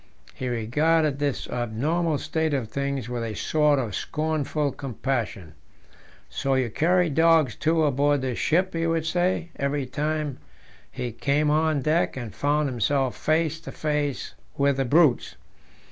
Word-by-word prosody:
He 130 Hz, -, -5 dB
regarded 145 Hz, +6 st, +1 dB
this 145 Hz, -2 st, -1 dB
abnormal 145 Hz, +8 st, -1 dB
state 160 Hz, +1 st, -1 dB
of 120 Hz, -5 st, -3 dB
things 140 Hz, -1 st, -2 dB
with 120 Hz, -1 st, -3 dB
a 110 Hz, -2 st, -4 dB
sort 150 Hz, +2 st, +2 dB
of 120 Hz, -6 st, -2 dB
scornful 155 Hz, 0 st, -1 dB
compassion. 120 Hz, -, -4 dB, 0.7 s
"So 135 Hz, 0 st, -1 dB
you 130 Hz, -4 st, 0 dB
carry 180 Hz, +7 st, +2 dB
dogs, 160 Hz, -4 st, +4 dB
too, 160 Hz, +1 st, +1 dB
aboard 145 Hz, 0 st, +2 dB
this 130 Hz, -2 st, -3 dB
ship," 185 Hz, +4 st, +1 dB
he 165 Hz, 0 st, 0 dB
would 165 Hz, -1 st, 0 dB
say, 175 Hz, +1 st, 0 dB
every 140 Hz, 0 st, -1 dB
time 150 Hz, +1 st, -2 dB, 0.5 s
he 125 Hz, -1 st, -4 dB
came 145 Hz, +6 st, +1 dB
on 155 Hz, -2 st, +1 dB
deck 155 Hz, -1 st, +1 dB
and 120 Hz, -5 st, -6 dB
found 145 Hz, +1 st, +1 dB
himself 130 Hz, +1 st, 0 dB
face 160 Hz, 0 st, 0 dB
to -, -, -9 dB
face 150 Hz, -3 st, -2 dB, 0.2 s
with 140 Hz, -1 st, +2 dB
the 135 Hz, -, +1 dB
"brutes." 145 Hz, 0 st, +3 dB
145 Hz, 145 wpm, -25 LUFS, 130-160 Hz, 0.7 s, dogs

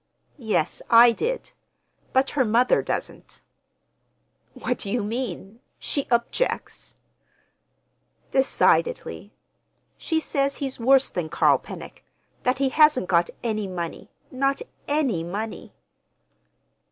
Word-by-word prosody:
"Yes, 215 Hz, -, -1 dB
I 235 Hz, +1 st, +8 dB
did—but 275 Hz, -, -4 dB
her 275 Hz, -, +2 dB
mother 235 Hz, +2 st, +3 dB
doesn't." -, -, -5 dB, 1.2 s
"What 250 Hz, -, -3 dB
do 200 Hz, -, -4 dB
you 230 Hz, +1 st, 0 dB
mean? 215 Hz, -2 st, -5 dB, 0.2 s
She—objects?" 260 Hz, -, -2 dB, 1.4 s
"Decidedly! 280 Hz, -, +1 dB, 0.7 s
She 320 Hz, -2 st, 0 dB
says 280 Hz, -3 st, -1 dB
he's 270 Hz, -2 st, -4 dB
worse 265 Hz, +3 st, +4 dB
than 170 Hz, -3 st, -4 dB
Carl -, -, +3 dB
Pennock—that 250 Hz, 0 st, -6 dB
he 270 Hz, 0 st, +1 dB
hasn't 300 Hz, -, +4 dB
got 170 Hz, -1 st, +3 dB
any 215 Hz, -3 st, -1 dB
money, 175 Hz, -3 st, -6 dB, 0.2 s
not 275 Hz, -, 0 dB, 0.2 s
any 275 Hz, -, 0 dB
money." 205 Hz, +6 st, -5 dB
245 Hz, 95 wpm, -24 LUFS, 210-275 Hz, 1.4 s, I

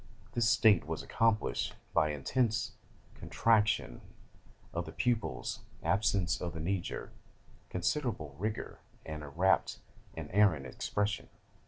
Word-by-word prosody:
This 120 Hz, -1 st, +2 dB
state 100 Hz, -10 st, +5 dB
was 80 Hz, 0 st, -3 dB
accompanied 110 Hz, -, +1 dB, 0.2 s
by 80 Hz, -2 st, +4 dB
an 75 Hz, -, -2 dB
intense 110 Hz, -, 0 dB, 0.4 s
contraction 110 Hz, -, +1 dB, 0.7 s
of -, -, -2 dB
the -, -, -6 dB
pupils, 115 Hz, -, -1 dB, 0.2 s
absence 95 Hz, -3 st, +2 dB
of 85 Hz, -, -3 dB
the 80 Hz, -, -5 dB
knee 95 Hz, +4 st, 0 dB
jerk, -, -, -6 dB, 0.6 s
considerable 90 Hz, -, -1 dB
rigor, 105 Hz, +2 st, -3 dB, 0.3 s
and 80 Hz, -1 st, -5 dB
a 75 Hz, -, -7 dB
rapt 90 Hz, +6 st, +2 dB, 0.4 s
and -, -, -6 dB
arrant 95 Hz, -9 st, +4 dB
expression. 105 Hz, +10 st, -2 dB
95 Hz, 125 wpm, -32 LUFS, 80-110 Hz, 0.7 s, state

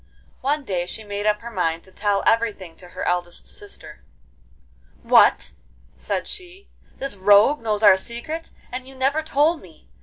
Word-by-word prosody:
One 285 Hz, +1 st, -1 dB
day 175 Hz, -4 st, -2 dB
she 220 Hz, -, -6 dB
made 205 Hz, 0 st, -3 dB
up 210 Hz, 0 st, +2 dB
her 235 Hz, +1 st, -8 dB
mind 170 Hz, -5 st, -1 dB
to 190 Hz, -, -16 dB
tell 200 Hz, 0 st, 0 dB
everything 215 Hz, -7 st, +1 dB
to 180 Hz, -, -13 dB
her -, -, -7 dB
eldest 175 Hz, -1 st, -2 dB
sister. 160 Hz, -6 st, -11 dB, 1.0 s
'What!' -, -, +5 dB, 0.4 s
said 195 Hz, -2 st, -3 dB
she, 370 Hz, +2 st, -8 dB, 0.3 s
'this 275 Hz, -4 st, -4 dB
rogue 205 Hz, +9 st, +5 dB
knows 215 Hz, -1 st, -1 dB
our 205 Hz, -3 st, +8 dB
secret, 240 Hz, +11 st, -5 dB, 0.2 s
and 255 Hz, +1 st, -6 dB
you 270 Hz, -, -12 dB
never 270 Hz, +4 st, +1 dB
told 315 Hz, +2 st, +1 dB
me! 165 Hz, -, -18 dB
210 Hz, 160 wpm, -22 LUFS, 190-270 Hz, 1.0 s, our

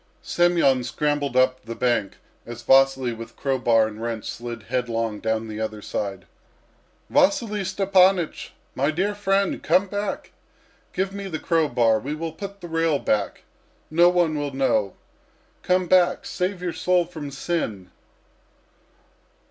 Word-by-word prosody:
Semyon 170 Hz, -7 st, +2 dB
scrambled 145 Hz, 0 st, -1 dB
up 130 Hz, 0 st, +3 dB
the 115 Hz, 0 st, -7 dB
bank, 120 Hz, -5 st, 0 dB, 0.3 s
as 120 Hz, 0 st, -9 dB
Vasily 135 Hz, -2 st, +4 dB
with 115 Hz, 0 st, -10 dB
crow 135 Hz, -2 st, -1 dB
bar 115 Hz, -3 st, +4 dB
and 110 Hz, 0 st, -7 dB
wrench 115 Hz, -2 st, -4 dB
slid 120 Hz, -2 st, -6 dB
headlong 115 Hz, -3 st, -2 dB
down 110 Hz, +1 st, -1 dB
the 110 Hz, 0 st, -6 dB
other 110 Hz, -1 st, -3 dB
side. 100 Hz, -2 st, -4 dB, 0.9 s
"Vasily 210 Hz, 0 st, +2 dB
Stepanych! 190 Hz, -2 st, +2 dB, 0.2 s
My 140 Hz, +3 st, 0 dB
dear 190 Hz, +7 st, 0 dB
friend, 200 Hz, -1 st, 0 dB
come 190 Hz, -, +3 dB
back! 205 Hz, +1 st, -4 dB, 0.6 s
Give 190 Hz, +1 st, -2 dB
me 200 Hz, 0 st, -5 dB
the 165 Hz, -4 st, -3 dB
crow 165 Hz, -1 st, +1 dB
bar. 115 Hz, -4 st, +3 dB
We 140 Hz, +7 st, -4 dB
will 165 Hz, +1 st, -4 dB
put 200 Hz, +4 st, -8 dB
the 175 Hz, -, -7 dB
rail 165 Hz, -2 st, +1 dB
back; 105 Hz, -6 st, -1 dB, 0.5 s
no 170 Hz, +2 st, +6 dB
one 175 Hz, -3 st, +2 dB
will 145 Hz, -1 st, -3 dB
know. 120 Hz, -7 st, +1 dB, 0.7 s
Come 185 Hz, 0 st, +1 dB
back! 180 Hz, 0 st, +3 dB
Save 180 Hz, 0 st, -3 dB
your 175 Hz, -2 st, -2 dB
soul 180 Hz, -1 st, +2 dB
from 160 Hz, -4 st, -7 dB
sin!" 135 Hz, -, -3 dB
145 Hz, 145 wpm, -24 LUFS, 115-180 Hz, 0.9 s, no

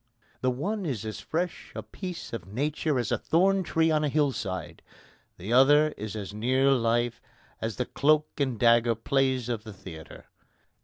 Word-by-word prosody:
The 130 Hz, -, +2 dB
one 190 Hz, -, -2 dB
is 125 Hz, -, -3 dB
as 110 Hz, -1 st, -5 dB
fresh 175 Hz, +2 st, -3 dB
a -, -, -5 dB
piece 180 Hz, -7 st, -7 dB
of 100 Hz, -6 st, -5 dB
nature 145 Hz, +6 st, -1 dB
as 120 Hz, -4 st, -1 dB
a -, -, +1 dB
thorn 190 Hz, +4 st, +3 dB
tree 160 Hz, -2 st, +1 dB
on 155 Hz, -1 st, +2 dB
a 150 Hz, -, +1 dB
hill 145 Hz, -1 st, +2 dB
side; 95 Hz, -7 st, -5 dB, 0.6 s
the 100 Hz, +6 st, -4 dB
other 145 Hz, +4 st, +6 dB
is 110 Hz, -7 st, -7 dB
as 100 Hz, -2 st, -6 dB
near 130 Hz, +5 st, +2 dB
life 120 Hz, -1 st, +1 dB, 0.4 s
as 110 Hz, -2 st, -2 dB
the 125 Hz, -, -2 dB
cloak 155 Hz, +3 st, +2 dB
and 130 Hz, -6 st, 0 dB
dagger 115 Hz, 0 st, +4 dB
plays 130 Hz, +1 st, 0 dB
of 115 Hz, -3 st, -3 dB
the 110 Hz, -2 st, -9 dB
theatre. 80 Hz, -4 st, -11 dB
130 Hz, 175 wpm, -27 LUFS, 115-150 Hz, 0.6 s, other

